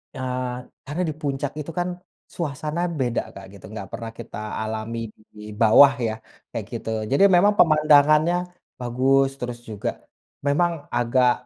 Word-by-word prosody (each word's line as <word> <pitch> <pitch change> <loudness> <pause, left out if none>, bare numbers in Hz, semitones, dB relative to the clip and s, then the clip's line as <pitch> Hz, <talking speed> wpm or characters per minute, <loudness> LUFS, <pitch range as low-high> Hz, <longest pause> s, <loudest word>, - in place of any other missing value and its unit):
Eee, 125 -1 -3 0.3
karena 150 +6 -3
di - - -3
puncak 140 -1 -2
itu, 150 +2 -5
kan, 175 - 0 0.5
suasana 155 +1 -3 0.2
beda, 120 -2 0
Kak, 100 - -9
gitu, 100 - -13
nggak 100 -3 -7
pernah 115 -1 -6
kita 115 - -8 0.3
alami 110 +1 -4 0.4
di 105 - -11 0.2
bawah, 115 +6 +8 0.2
ya, 110 - -2 0.4
kayak - - -4
gitu, - - -5 0.2
jadi 140 +8 +4
memang 205 +4 +5
pemandangannya 155 +1 +5 0.4
bagus, 135 +3 +2
terus 120 -1 -5
juga 105 -2 -3 0.6
memang 170 +5 +3 0.2
agak 125 +1 +3
135 Hz, 140 wpm, -23 LUFS, 120-150 Hz, 0.6 s, bawah